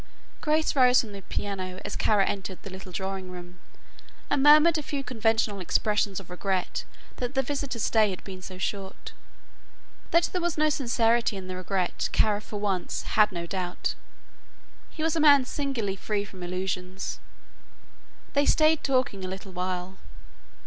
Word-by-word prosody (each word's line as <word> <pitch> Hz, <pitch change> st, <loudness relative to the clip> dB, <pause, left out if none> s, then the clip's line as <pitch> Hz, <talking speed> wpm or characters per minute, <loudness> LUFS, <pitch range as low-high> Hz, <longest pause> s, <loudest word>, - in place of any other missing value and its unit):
Grace 310 Hz, 0 st, +1 dB
rose 255 Hz, -2 st, +6 dB
from 225 Hz, -, -9 dB
the 200 Hz, -1 st, -8 dB
piano 185 Hz, -1 st, -4 dB
as -, -, -3 dB
Kara 205 Hz, -3 st, +3 dB
entered 190 Hz, -2 st, -3 dB
the 195 Hz, -, -8 dB
little 190 Hz, 0 st, -9 dB
drawing 190 Hz, 0 st, -4 dB
room 180 Hz, 0 st, -10 dB, 0.7 s
and 285 Hz, -, +3 dB
murmured 305 Hz, +3 st, +7 dB
a -, -, -2 dB
few 285 Hz, -1 st, -4 dB
conventional 225 Hz, -4 st, +1 dB
expressions 205 Hz, +1 st, +1 dB
of 185 Hz, -2 st, -13 dB
regret 185 Hz, 0 st, -2 dB, 0.3 s
that 250 Hz, +2 st, -3 dB
the 270 Hz, -, +3 dB
visitor's 275 Hz, -3 st, -3 dB
stay 215 Hz, -2 st, +4 dB
had 185 Hz, -, -6 dB
been 185 Hz, -2 st, -8 dB
so 185 Hz, 0 st, -8 dB
short. 195 Hz, +1 st, -4 dB, 1.0 s
That 335 Hz, +1 st, +4 dB
there 365 Hz, -, -1 dB
was 345 Hz, -2 st, -1 dB
no 305 Hz, 0 st, +3 dB
sincerity 235 Hz, -5 st, +2 dB
in 185 Hz, -1 st, -7 dB
that 185 Hz, -, -4 dB
regret 185 Hz, 0 st, -1 dB
Kara, 210 Hz, -1 st, +2 dB
for 210 Hz, -1 st, -6 dB
one, 195 Hz, -3 st, -1 dB, 0.2 s
had 210 Hz, -1 st, +4 dB
no 170 Hz, -2 st, -4 dB
doubt. 180 Hz, 0 st, -2 dB, 1.0 s
He 315 Hz, -, -5 dB
was 320 Hz, 0 st, +1 dB
a -, -, +1 dB
man 285 Hz, -3 st, +7 dB
singularly 250 Hz, -9 st, -2 dB
free 205 Hz, 0 st, -2 dB
from 190 Hz, -2 st, -12 dB
illusions. 185 Hz, +1 st, -3 dB, 1.1 s
They 285 Hz, 0 st, +3 dB
stayed 310 Hz, 0 st, +4 dB
talking 255 Hz, -8 st, +1 dB
a -, -, -3 dB
little 190 Hz, +1 st, -7 dB
while. 180 Hz, +1 st, -4 dB
205 Hz, 165 wpm, -27 LUFS, 185-265 Hz, 1.1 s, murmured